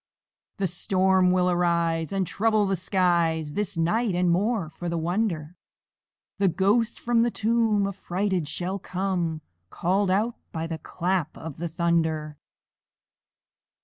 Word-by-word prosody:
The 200 - 0
storm 185 +1 +2
will 180 0 +3
arise, 170 -2 +1
And 195 -1 0
trouble 215 +3 +1
the 195 0 +1
skies 170 -4 +1
This 205 -2 -2
night; 200 +5 +1
and, 180 -1 +2
more 195 -2 0
for 175 +2 -5
the 170 - -1
wonder, 170 -2 -1 0.8
The 200 - +4
ghost 205 +6 +1
from 235 -1 +2
the 240 - +3
tomb 220 -2 +1
Affrighted 190 -3 -2
shall 180 +6 -3
come, 180 -4 -2 0.3
Call'd 190 - 0
out 215 +5 +1
by 160 0 -3
the 165 -1 -5
clap 175 0 -2
of 160 -4 -8
the 170 - -3
thunder. 160 -3 0
180 Hz, 135 wpm, -26 LUFS, 165-200 Hz, 0.8 s, The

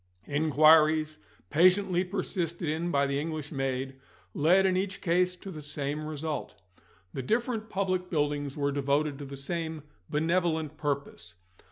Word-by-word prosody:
Inquiries, 155 +1 +4 0.3
patiently 185 +2 +4
persisted 180 -3 -3
in 160 +3 -1
by 140 -4 +2
the 140 0 -1
English 155 -1 -4
maid, 135 -1 -3 0.3
led 180 +6 +4
in 185 -1 +3
each 190 +1 -2
case 180 0 +1
to 195 +1 -9
the 155 -3 -8
same 145 +1 -3
result. 155 0 -4 0.6
The 135 - -3
different 225 - -1
public 185 -2 -1
buildings 145 -3 -1
were 140 -1 0
devoted 140 +1 0
to 145 - -6
the 140 0 -8
same 160 +1 -4 0.3
benevolent 160 -1 0
purpose. 140 - -4
155 Hz, 140 wpm, -29 LUFS, 145-180 Hz, 0.6 s, Inquiries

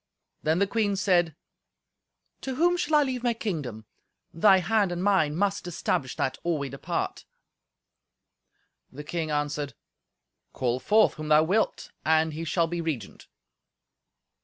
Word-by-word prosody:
Then 160 +2 +1
the 200 - +3
queen 205 -1 0
said, 175 -5 +2 1.1
"To 265 -1 -4
whom 350 +5 +3
shall 315 -3 0
I 295 - +6
leave 255 -3 -3
my 240 -1 0
kingdom? 145 - -4 0.5
Thy 190 +3 +5
hand 195 +1 +1
and 175 +1 -3
mine 190 -7 +2
must 200 0 -1
establish 160 -6 -2
that 130 0 -2
or 170 -2 0
we 140 -1 -4
depart." 135 +1 -4 1.7
The 145 +3 -8
king 160 +1 -3
answered, 145 -1 -2 0.8
"Call 125 0 -1
forth 215 +10 +4
whom 155 -1 -7
thou 155 0 +5
wilt, 200 +7 0
and 160 0 +2
he 165 +2 -5
shall 170 +2 +1
be 170 +1 -3
regent." 160 -8 -5
170 Hz, 140 wpm, -27 LUFS, 150-205 Hz, 1.7 s, I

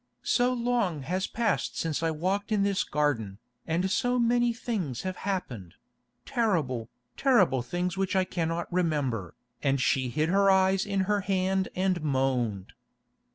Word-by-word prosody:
So 245 0 +2
long 235 - 0
has 185 +6 -1
passed 230 -2 -1
since 160 -2 -1
I 165 - +1
walked 190 +7 -2
in 205 -2 +2
this 200 -1 +1
garden, 120 -10 -1 0.3
and 180 +4 0
so 245 +3 +1
many 240 0 +3
things 210 - -3
have 185 -1 -4
happened—terrible, 125 - -3 0.3
terrible 190 - +3
things 175 +8 -3
which 195 0 -1
I 190 - +4
cannot 170 -1 -3
remember," 145 - -1 0.3
and 135 -1 +1
she 130 0 +1
hid 155 +6 0
her 195 +2 +4
eyes 190 +1 +3
in 200 -1 0
her 205 +1 +1
hand 190 0 0
and 185 -2 0
moaned. 130 -9 -1
180 Hz, 145 wpm, -28 LUFS, 135-200 Hz, 0.3 s, I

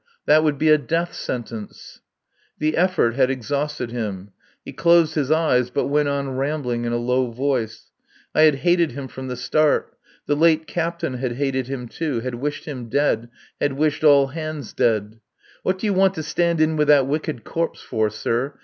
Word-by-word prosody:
That 155 +1 +5
would 150 -2 +1
be 155 +2 +2
a 155 0 +6
death 165 +4 -2
sentence. 115 -3 -7 0.6
The 155 0 0
effort 175 -9 +2
had 130 0 +2
exhausted 135 0 -3
him. 105 -5 -5 0.3
He - - -8
closed 170 -2 +4
his 145 -4 -1
eyes, 155 -6 +2
but 140 +2 -1
went 145 0 +2
on 140 -2 -2
rambling 135 -4 -2
in 120 - -1
a 120 - 0
low 125 +1 0
voice. 125 -2 -3 0.4
I - - +3
had 155 -2 +6
hated 175 -5 +3
him 135 0 -6
from 130 +1 -8
the 125 - -4
start. 150 +5 +1 0.3
The 145 - +1
late 160 +1 +3
captain 170 -6 -3
had 125 -2 -2
hated 130 -1 -1
him, 130 -2 -5
too. 140 -2 -3
Had 130 +1 -4
wished 145 +5 -4
him 125 -6 -7
dead. 120 -3 +1 0.3
Had 145 -1 0
wished 150 +2 0
all 140 -3 +6
hands 155 -3 -6
dead.... 110 -1 0 0.4
"What 185 +1 0
do 190 - -5
you 205 - +2
want 190 0 +3
to 155 - -4
stand 170 +1 0
in 155 0 +2
with 150 -1 +2
that 145 -3 +6
wicked 150 -2 -3
corpse 165 0 -3
for, 110 -2 0
sir? 115 +6 -2
140 Hz, 190 wpm, -22 LUFS, 125-155 Hz, 0.6 s, a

